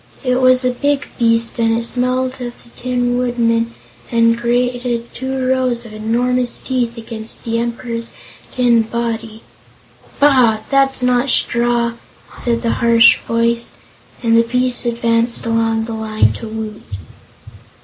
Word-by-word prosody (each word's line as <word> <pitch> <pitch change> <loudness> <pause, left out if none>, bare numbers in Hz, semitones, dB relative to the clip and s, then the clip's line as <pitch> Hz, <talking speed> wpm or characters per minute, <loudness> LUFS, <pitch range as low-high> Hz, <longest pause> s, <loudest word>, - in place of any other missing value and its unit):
It 255 0 +1
was 255 0 +4
a 250 - +2
big 285 +3 -1
beast 230 0 +1
and 225 0 +2
it 230 - -2
smelled 255 +2 -1
of 240 -1 -7
the - - -19
Tin 245 -1 -1
Woodman 230 -2 0 0.4
and 230 -1 +3
grated 240 0 -1
two 260 0 -3
rows 255 -2 0
of 220 - -11
enormous 240 +3 -1
teeth 245 -3 -2
against 225 -1 -6
the 230 0 -1
Emperor's 235 0 -4 0.4
tin 240 -2 +3
body. 225 -1 -4 0.8
"Bah! 255 -7 +4
that's 270 -1 +3
not 250 +1 +2
straw," 235 -1 +2 0.4
said 235 -1 -1
the 230 - +1
harsh 230 -1 +6
voice, 230 0 -1 0.5
and 230 -1 +3
the 230 - +6
beast 250 +1 0
advanced 235 0 0
along 225 -1 +1
the 225 0 -5
line 220 -1 +1
to 230 - -8
Woot. 215 -1 -6
235 Hz, 140 wpm, -17 LUFS, 230-250 Hz, 0.8 s, harsh